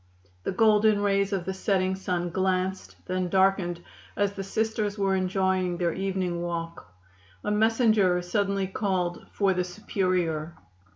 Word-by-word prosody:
The - - -2
golden 210 0 +4
rays 200 0 +2
of 190 -3 -2
the 190 - -2
setting 190 -1 0
sun 180 -2 -2
glanced, 190 +1 -1
then 185 -1 -1
darkened 190 -2 +2 0.3
as 205 -1 +1
the 195 - -5
Sisters 215 0 -1
were 195 -1 +1
enjoying 185 -1 0
their 170 -2 0
evening 185 -2 -2
walk. 165 - -5 0.5
A - - -1
messenger 215 -4 +3
suddenly 195 +1 0
called 185 -3 -2
for 195 -2 +2
the 180 0 0
Superior. 180 -4 -1
190 Hz, 135 wpm, -27 LUFS, 180-200 Hz, 0.5 s, golden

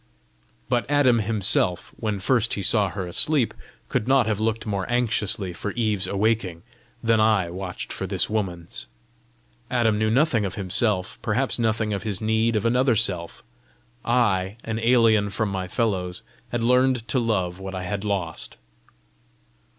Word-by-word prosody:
But 120 0 0
Adam 135 -5 +4
himself, 100 -4 +1
when 105 -3 -2
first 115 +4 +1
he 100 - -4
saw 105 0 +2
her 95 0 -4
asleep, 125 - +3 0.3
could 110 - -1
not 135 -2 +4
have 110 -2 -1
looked 110 0 -1
more 100 +1 -3
anxiously 110 -5 0
for 105 +4 -5
Eve's 105 -5 0
awaking 100 -4 0 0.4
than 115 -1 +3
I 105 -5 +2
watched 90 0 -6
for - - -4
this - - +2
woman's. 90 - -3 0.8
Adam 115 -4 +2
knew 110 0 +2
nothing 120 -2 +2
of 95 -2 -3
himself, 95 0 -1
perhaps 125 +4 0
nothing 110 -2 0
of 100 - -2
his 105 -4 -2
need 110 +1 +1
of 110 +1 0
another 125 +1 +3
self; 95 -6 0 0.6
I, 105 -5 +1
an 110 0 -3
alien 115 -3 +4
from 105 +1 -1
my 95 -1 -3
fellows, 90 -5 -1 0.3
had 120 -1 -2
learned 125 -1 +2
to 130 - +2
love 95 -6 -1
what 95 0 -6
I 90 - -4
had 100 +3 -3
lost! 95 -6 -3
110 Hz, 155 wpm, -24 LUFS, 95-115 Hz, 0.8 s, Adam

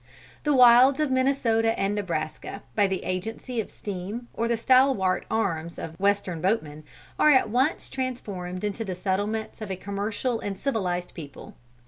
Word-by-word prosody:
"The 295 -1 +3
wilds 250 +3 +7
of 305 -3 +1
Minnesota 255 -4 +2
and 195 +1 +1
Nebraska, 185 0 -4
by 205 -2 +4
the 190 -1 -3
agency 225 +7 -3
of - - -9
steam 205 +5 -6
or 230 - -1
the 235 0 +1
stalwart 255 -6 +3
arms 170 -7 -1
of 160 - -6
Western 200 -4 0
boatmen, 155 -6 -1 0.4
are 305 - +6
at 260 -6 +5
once 260 +6 +1
transformed 200 -9 -5
into 210 +2 -2
the 190 -4 -4
settlements 205 +4 -2
of 215 - -5
a 190 - -2
commercial 205 +5 -2
and 200 -1 -4
civilized 185 -8 -2
people. 145 -5 -10
205 Hz, 155 wpm, -26 LUFS, 185-240 Hz, 0.4 s, wilds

